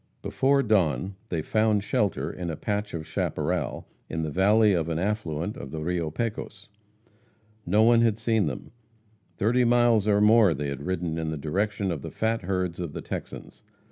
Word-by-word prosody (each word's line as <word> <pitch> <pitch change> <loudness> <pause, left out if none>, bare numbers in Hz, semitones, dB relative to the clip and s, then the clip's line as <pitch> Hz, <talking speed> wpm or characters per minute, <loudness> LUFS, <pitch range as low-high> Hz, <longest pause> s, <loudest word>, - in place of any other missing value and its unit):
Before 140 +1 +2
dawn 95 - +1 0.2
they 80 -3 -2
found 110 0 +1
shelter 105 -3 -1
in 90 -2 -5
a 80 - -3
patch 105 +2 -3
of 80 -2 -5
chaparral - - -2 0.2
in 80 0 -3
the 80 - -3
valley 105 +4 +4
of 85 -2 0
an 80 - -1
affluent 95 -1 -2
of 70 - -8
the 80 +2 -5
Rio 85 -1 -1
Pecos. 105 +1 -5 1.0
No 105 +5 +4
one 115 0 +5
had 115 -3 +2
seen 110 -4 +1
them. 65 - -6 0.7
Thirty 120 +5 +2
miles 120 -3 +3
and 105 0 +4
more 105 -6 +5
they 70 +1 -3
had 70 +3 -6
ridden 85 -3 -2
in 80 -1 -2
the 80 - -3
direction 100 +6 -1
of 80 -5 -4
the - - -6
fat 115 +1 -1
herds 90 -2 -2
of 85 -4 -4
the - - -5
Texans. - - -7
100 Hz, 180 wpm, -26 LUFS, 80-110 Hz, 1.0 s, one